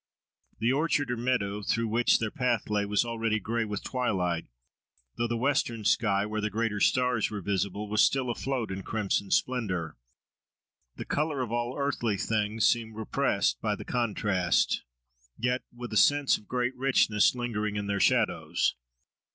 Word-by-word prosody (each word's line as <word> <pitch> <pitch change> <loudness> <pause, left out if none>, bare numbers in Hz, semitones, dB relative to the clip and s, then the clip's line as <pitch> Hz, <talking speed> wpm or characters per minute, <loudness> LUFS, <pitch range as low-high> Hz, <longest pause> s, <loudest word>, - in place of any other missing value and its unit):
The 115 +4 +1
orchard 145 -3 +1
or - - 0
meadow, 115 -4 -1
through 115 +2 0
which 115 +2 +3
their 110 -2 -2
path 120 -4 -1
lay, 105 -1 +1
was 105 +3 +2
already 115 -2 -1
gray 115 +2 -1
with 105 -2 -4
twilight, 90 -10 -1 0.7
though 120 - -1
the 120 0 -2
western 120 -4 0
sky, 100 -2 +2
where 110 0 -3
the 105 - -1
greater 110 0 -1
stars 125 -1 +2
were 105 - -4
visible, 100 +2 -2
was 105 +1 +2
still 130 -3 +2
afloat 125 -3 -3
in 95 0 -4
crimson 100 -1 -1
splendour. 95 - -1 1.0
The - - -6
colour 150 -2 -1
of 115 - -6
all 120 +1 -2
earthly 125 -7 -1
things 105 +1 0
seemed 115 -2 +1
repressed 110 -1 0
by 105 -2 0
the - - -9
contrast, 105 -7 +1 0.6
yet 125 +2 0
with 120 -1 -8
a - - +2
sense 145 +6 +4
of 105 - -10
great 125 0 -1
richness 125 -5 +3
lingering 105 -4 -2
in 105 0 -2
their 100 0 -1
shadows. - - +2
115 Hz, 160 wpm, -28 LUFS, 105-125 Hz, 1.0 s, sense